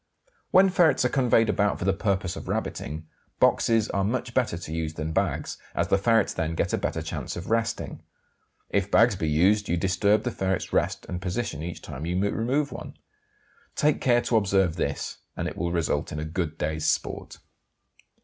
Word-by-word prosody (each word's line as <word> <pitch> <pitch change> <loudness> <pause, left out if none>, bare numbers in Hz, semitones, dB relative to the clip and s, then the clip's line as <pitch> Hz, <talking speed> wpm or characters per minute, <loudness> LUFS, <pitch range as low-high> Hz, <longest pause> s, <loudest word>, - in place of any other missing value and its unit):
When 190 +1 +6
ferrets 170 -7 +4
are - - +3
conveyed 120 -4 +3
about 105 -1 +1
for - - -4
the 95 - +3
purpose 95 -2 -1
of - - -8
rabbiting, 80 +2 -3 0.3
boxes 115 -2 +3
are 100 - 0
much 120 +3 -2
better 120 -10 +1
to 80 -2 -7
use 80 -1 -3
than 80 +1 -3
bags, - - -1 0.2
as - - 0
the 95 - +4
ferrets 115 +1 +3
then 80 0 -2
get - - -1
a - - +2
better - - -2
chance - - -5
of 90 +4 -6
resting. 115 0 -1 0.7
If 100 -1 +1
bags 115 +1 +5
be 80 -4 -1
used 95 +7 +3
you 85 - +1
disturb 95 +4 +2
the 120 - -1
ferrets' 95 -3 -2
rest - - 0
and 90 - -4
position 95 -4 -3
each 85 +1 -6
time 75 +6 -6
you 90 +1 0
remove 120 +8 0
one. - - -8 0.8
Take 150 0 +2
care 120 -2 +4
to 115 - +2
observe 95 -5 +2
this 85 - -3 0.2
and - - -2
it - - -5
will 85 +1 -2
result 80 -4 -1
in 75 - -4
a 75 - -3
good 80 -1 -3
day's 80 0 -2
sport. - - -2
95 Hz, 190 wpm, -26 LUFS, 85-115 Hz, 0.8 s, When